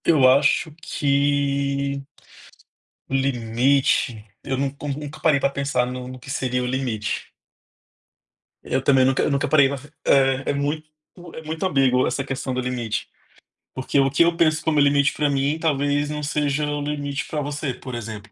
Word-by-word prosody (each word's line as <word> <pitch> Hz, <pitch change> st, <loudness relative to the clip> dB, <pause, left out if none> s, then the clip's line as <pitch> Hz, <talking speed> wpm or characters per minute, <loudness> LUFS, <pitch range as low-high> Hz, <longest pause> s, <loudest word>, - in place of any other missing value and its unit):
Eu 150 Hz, -6 st, +5 dB
acho 140 Hz, +3 st, +3 dB
que 140 Hz, -1 st, 0 dB, 1.1 s
limite, 125 Hz, -3 st, +1 dB, 0.2 s
eu 135 Hz, -1 st, -2 dB
nu 140 Hz, +1 st, -2 dB, 0.2 s
nunca 150 Hz, 0 st, -8 dB
parei 155 Hz, -4 st, +3 dB
pra 140 Hz, -, +2 dB
pensar 140 Hz, -2 st, 0 dB
no 125 Hz, 0 st, -6 dB
no 130 Hz, 0 st, -9 dB
que 130 Hz, -, -13 dB
seria 125 Hz, -2 st, -1 dB
o -, -, -2 dB
limite. 125 Hz, -5 st, -3 dB, 1.3 s
Eu -, -, -1 dB
também 135 Hz, -1 st, +4 dB
nunca 130 Hz, 0 st, +2 dB
nunca 140 Hz, -1 st, 0 dB
parei 140 Hz, -3 st, +5 dB, 0.4 s
é, 135 Hz, -1 st, +3 dB
é -, -, -1 dB
muito 145 Hz, +2 st, -2 dB, 0.5 s
é -, -, -7 dB
muito 160 Hz, +3 st, -3 dB
ambíguo 135 Hz, -7 st, +3 dB
essa 135 Hz, -, -1 dB
questão 135 Hz, -1 st, -4 dB
do 130 Hz, -, -1 dB
limite. 125 Hz, -3 st, -3 dB, 0.6 s
Porque 130 Hz, +2 st, 0 dB
o 135 Hz, 0 st, +4 dB
que 140 Hz, +5 st, +4 dB
eu 170 Hz, 0 st, +2 dB
penso 155 Hz, -2 st, +2 dB
como 155 Hz, -2 st, +2 dB
limite 140 Hz, 0 st, +3 dB
pra 150 Hz, -1 st, 0 dB
mim 140 Hz, +3 st, 0 dB
talvez 145 Hz, -2 st, 0 dB
não 150 Hz, 0 st, -4 dB
seja 150 Hz, 0 st, 0 dB
o 145 Hz, 0 st, -2 dB
limite 145 Hz, -1 st, -3 dB
pra 150 Hz, -, -3 dB
você, 145 Hz, -1 st, -3 dB
por 130 Hz, +1 st, -9 dB
exemplo. 110 Hz, -3 st, -7 dB
140 Hz, 160 wpm, -23 LUFS, 130-145 Hz, 1.3 s, Eu